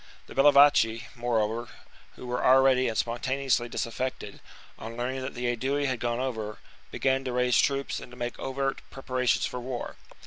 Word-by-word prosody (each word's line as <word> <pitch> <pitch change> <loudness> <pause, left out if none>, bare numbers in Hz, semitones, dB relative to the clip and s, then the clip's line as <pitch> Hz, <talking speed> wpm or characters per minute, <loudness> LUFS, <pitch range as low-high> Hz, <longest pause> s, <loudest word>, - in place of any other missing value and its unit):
The - - -12
Bellovaci, 140 -5 +5
moreover, 120 -1 -1 0.5
who - - -10
were 125 0 -2
already 130 0 +5
and 110 -2 -2
spontaneously 120 +2 0
disaffected, 130 +3 -4 0.4
on 115 +1 -8
learning 130 +2 -2
that 130 +1 -5
the 125 0 -4
Aedui 135 +4 0
had 130 -3 -1
gone 120 0 -1
over, 110 -5 -3 0.3
began 135 0 0
to 130 - -2
raise 125 -1 +2
troops 140 0 0
and 125 - -11
to 125 - -12
make 120 -1 -4
overt 135 0 -2
preparations 130 -2 0
for 125 - -4
war. 125 -1 -5
125 Hz, 165 wpm, -27 LUFS, 120-135 Hz, 0.5 s, Bellovaci